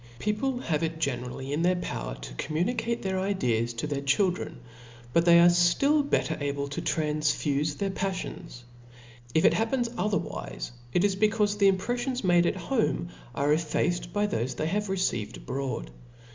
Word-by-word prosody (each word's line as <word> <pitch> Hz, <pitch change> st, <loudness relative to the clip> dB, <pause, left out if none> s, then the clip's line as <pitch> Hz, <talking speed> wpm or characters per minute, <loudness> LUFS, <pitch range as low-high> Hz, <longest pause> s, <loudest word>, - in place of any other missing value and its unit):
People 215 Hz, -, -1 dB
have 160 Hz, -11 st, -1 dB
k 165 Hz, -, +1 dB
generally 130 Hz, -1 st, -3 dB
in 150 Hz, -, 0 dB
their 180 Hz, +1 st, +3 dB
power 175 Hz, -, -4 dB
fo -, -, -9 dB
com 155 Hz, -, -3 dB
municate 230 Hz, +5 st, -1 dB
their, 190 Hz, -1 st, -1 dB
ideas 125 Hz, -, 0 dB
to 115 Hz, -, -3 dB
their 145 Hz, -2 st, -2 dB
children 180 Hz, +7 st, +1 dB
j -, -, -14 dB, 0.5 s
but 170 Hz, -, +4 dB
they 170 Hz, -1 st, +8 dB
^ 170 Hz, -, +7 dB
ftill 225 Hz, -, +4 dB
better 160 Hz, -, +1 dB
able 140 Hz, 0 st, -2 dB
to 140 Hz, -, -4 dB
transfufe 150 Hz, -1 st, 0 dB
their 200 Hz, -1 st, -1 dB
paflions. 185 Hz, -8 st, -4 dB, 0.7 s
If 160 Hz, -, +4 dB
it -, -, +6 dB
happens 235 Hz, +2 st, 0 dB
otherwife, 120 Hz, -, -2 dB, 0.2 s
it 180 Hz, -, +2 dB
is 200 Hz, -2 st, +2 dB
becaufe 210 Hz, 0 st, +2 dB
the 200 Hz, -, +6 dB
im 195 Hz, -1 st, +4 dB
prelTions 245 Hz, +5 st, -2 dB
ipade 175 Hz, -2 st, +4 dB
at -, -, 0 dB
home 220 Hz, -9 st, -1 dB, 0.3 s
are 145 Hz, +4 st, +2 dB
effaced 165 Hz, +2 st, 0 dB
by 205 Hz, 0 st, +1 dB
thofc 130 Hz, -, -2 dB
they 155 Hz, -, -2 dB
have 205 Hz, +5 st, -1 dB
received 185 Hz, -, -1 dB
abroad. -, -, -4 dB
175 Hz, 170 wpm, -28 LUFS, 140-205 Hz, 0.7 s, they